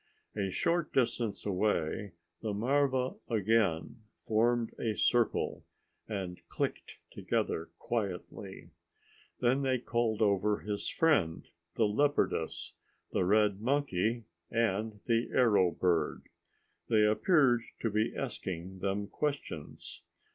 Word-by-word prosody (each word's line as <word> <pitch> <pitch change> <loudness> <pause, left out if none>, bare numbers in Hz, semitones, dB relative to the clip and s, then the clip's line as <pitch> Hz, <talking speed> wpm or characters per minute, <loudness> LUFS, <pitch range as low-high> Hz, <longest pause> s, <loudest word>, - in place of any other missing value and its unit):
A 100 -2 -1
short 170 - 0
distance 120 -4 0
away 100 -1 0 0.3
the 105 -3 -2
marva 130 +2 +1
again 110 -5 +1 0.2
formed 115 +1 +2
a 110 -2 -1
circle 120 0 +1 0.4
and 95 -4 -4
clicked - - -3
together 80 0 -2
quietly. 100 -7 -4 0.7
Then 125 +3 +3
they 130 -1 +2
called 115 -2 0
over 105 0 +2
his 105 -1 -3
friend, 140 - +2 0.3
the 115 - +3
leopardess, 110 - 0 0.4
the - - +1
red 105 0 +3
monkey 120 -4 0 0.3
and 110 -2 0
the 115 0 +1
arrow 105 -7 +4
bird. 85 -1 0 0.7
They 110 -2 +5
appeared 125 - +4 0.2
to 115 - 0
be 110 +2 0
asking 95 -7 -5
them 100 +2 -1
questions. 140 - -4
110 Hz, 105 wpm, -32 LUFS, 100-120 Hz, 0.7 s, They